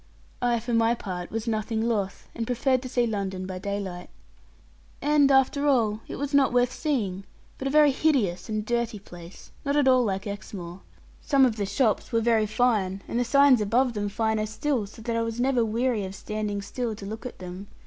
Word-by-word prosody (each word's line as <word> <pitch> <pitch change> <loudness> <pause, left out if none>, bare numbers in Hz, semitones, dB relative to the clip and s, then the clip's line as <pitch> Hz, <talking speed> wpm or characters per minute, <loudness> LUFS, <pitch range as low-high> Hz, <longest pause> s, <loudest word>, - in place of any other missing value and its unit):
I 240 -1 +2
for 235 +2 -4
my 230 +1 +3
part 180 -5 -6
was 225 +1 -4
nothing 220 0 -1
loth, 205 -5 -2
and 230 -1 -4
preferred 255 +1 +1
to 255 - -7
see 245 -1 +1
London 195 -4 -3
by 185 -1 -5
daylight. 195 -2 -4 0.9
And 290 -1 +4
after 275 +2 +3
all, 225 -6 +2
it - - -6
was 285 +1 -4
not 280 -1 +4
worth 245 0 +2
seeing, 210 - -2 0.4
but 270 - -2
a - - +1
very 300 0 +5
hideous 255 - +1
and 215 -1 -2
dirty 235 -1 -1
place, 175 -3 -13
not 280 0 0
at 290 -2 +3
all 255 -1 +5
like 195 -3 -2
Exmoor. 190 -3 -7 0.4
Some 275 -2 +4
of 240 -4 +1
the 200 -2 -1
shops 215 +3 0
were 230 - +2
very 225 -2 +2
fine, 210 -4 +1
and 235 - -1
the - - +2
signs 275 0 +5
above 240 +4 +2
them 205 -1 -2
finer 220 0 0
still, 220 +1 -1
so 215 +2 -13
that 230 0 -2
I 230 - +1
was 230 0 -3
never 250 -1 +2
weary 230 0 0
of 190 +1 -7
standing 210 0 -4
still 230 +2 -3
to 200 - -9
look 220 +5 -6
at - - -11
them. 185 +2 -8
225 Hz, 205 wpm, -26 LUFS, 200-255 Hz, 0.9 s, very